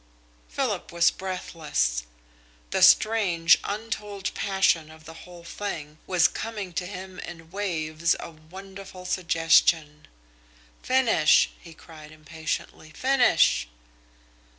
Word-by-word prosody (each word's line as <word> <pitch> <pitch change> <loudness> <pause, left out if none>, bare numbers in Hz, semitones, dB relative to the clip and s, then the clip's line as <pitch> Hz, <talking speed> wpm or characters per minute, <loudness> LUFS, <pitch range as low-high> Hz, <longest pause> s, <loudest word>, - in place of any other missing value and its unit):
Philip - - -3
was 170 0 +3
breathless. 150 - -2 0.7
The - - 0
strange, 185 -7 +5
untold 210 -2 -4
passion 190 -5 +1
of 155 0 -15
the 165 - -10 0.2
whole 175 -1 -12
thing 160 -4 -6
was 180 -3 +4
coming 210 -5 -6
to 180 +2 -3
him 185 -1 -9
in 165 -1 -10
waves 165 -4 -1
of 155 -1 -12
wonderful 190 -1 -10
suggestion. 165 -3 +2 0.7
"Finish!" 240 -12 +3
he 165 -2 -14
cried 155 -2 -14
impatiently. 155 0 -6
"Finish!" 245 - +2
170 Hz, 105 wpm, -25 LUFS, 155-195 Hz, 0.7 s, strange